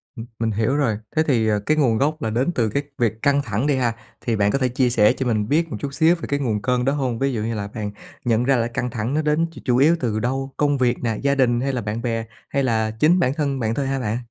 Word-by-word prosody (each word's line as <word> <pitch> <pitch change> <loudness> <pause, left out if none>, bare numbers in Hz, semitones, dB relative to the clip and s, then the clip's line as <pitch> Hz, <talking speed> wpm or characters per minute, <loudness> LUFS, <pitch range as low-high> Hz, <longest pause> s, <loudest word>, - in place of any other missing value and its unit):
Ừm, 115 - -7
mình 115 -1 0
hiểu 110 +6 0
rồi. 130 -8 +1 0.2
Thế 155 - +4
thì, 115 -5 +2
à, 105 -1 +2
cái 155 - +2
nguồn 120 -7 +3
gốc 155 +5 0
là 110 - -1
đến 125 +9 0
từ 115 -3 +1
cái 140 +7 -1
việc 110 -2 0
căng 140 0 +3
thẳng 115 +2 -2
đi 145 - +2
ha, 120 -3 +1 0.3
thì 115 - -1
bạn 105 -1 +2
có 140 - 0
thể 130 - +2
chia 125 0 +1
sẻ 105 -3 +4
cho 130 - -3
mình 110 -3 0
biết 165 +3 +2
một - - -3
chút 140 -1 -4
xíu 165 +3 +4
về 165 - -13
cái 140 0 -1
nguồn 110 -6 -1
cơn 125 +1 0
đó 135 - +2
hông? 130 -5 -2
Ví 135 -1 0
dụ 110 - -2
như 115 +1 -2
là 100 -1 -3
bạn 105 -1 -5 0.3
nhận 115 0 +2
ra 135 +1 +3
là 115 -1 +1
căng 125 +1 -3
thẳng 115 +2 -3
nó 155 - +1
đến 150 +2 +1
ch - - -17
chủ 125 -2 +2
yếu 155 +5 +5
từ 110 -4 -1
đâu, 135 +3 -2
công 145 -1 +2
việc 125 -1 +1
nè, 110 -2 0
gia 140 0 +2
đình 120 -3 +2
hay 135 0 -1
là 125 - -1
bạn 105 +3 -3
bè? 115 -2 -2 0.2
Hay 140 - 0
là 110 -3 +1
chính 170 +4 +4
bản 130 -5 +2
thân 140 -3 -1
bạn 110 -1 0
thôi 140 -2 -1
hả 135 0 -1
bạn? 110 -1 -1
125 Hz, 300 wpm, -22 LUFS, 115-140 Hz, 0.3 s, yếu